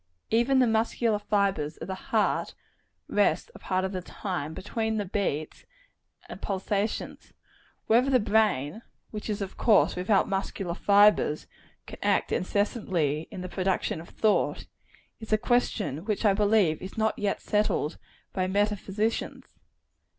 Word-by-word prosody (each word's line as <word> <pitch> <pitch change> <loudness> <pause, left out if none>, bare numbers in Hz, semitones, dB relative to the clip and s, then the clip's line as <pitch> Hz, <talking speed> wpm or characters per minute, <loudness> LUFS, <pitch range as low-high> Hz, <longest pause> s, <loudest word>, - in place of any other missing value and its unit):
Even 240 +4 +3
the 255 - +5
muscular 225 -1 +1
fibres 200 -7 0
of - - -7
the 190 - -3
heart 185 - -1 0.5
rest - - +1
a - - -12
part 185 0 -1
of 190 - -3
the 185 -2 -3
time, 175 -4 -5
between 220 +2 -2
the 205 - -1
beats 175 -6 -3 0.6
and - - -9
pulsations. 200 +2 -3 0.5
Whether 240 +4 +4
the 260 -2 +4
brain 210 - +1 0.3
which 215 0 -6
is 205 -1 -1
of 195 - -8
course 220 -3 +4
without 190 +3 +2
muscular 195 -2 -2
fibres 200 -5 +4 0.4
can - - -10
act - - +1
incessantly 180 - 0
in 185 - -7
the 185 - -5
production 185 -3 -1
of 170 - -13
thought, 215 -1 +1 0.5
is 220 -1 -10
a 215 - +5
question 215 - 0
which 215 0 -1
I 200 - +6
believe 205 -5 +2
is 190 +3 -8
not 220 0 0
yet 205 -1 0
settled 210 -7 0 0.3
by 185 -1 0
meta 205 +2 +1
physicians. 210 +4 -3
205 Hz, 145 wpm, -27 LUFS, 185-220 Hz, 0.6 s, I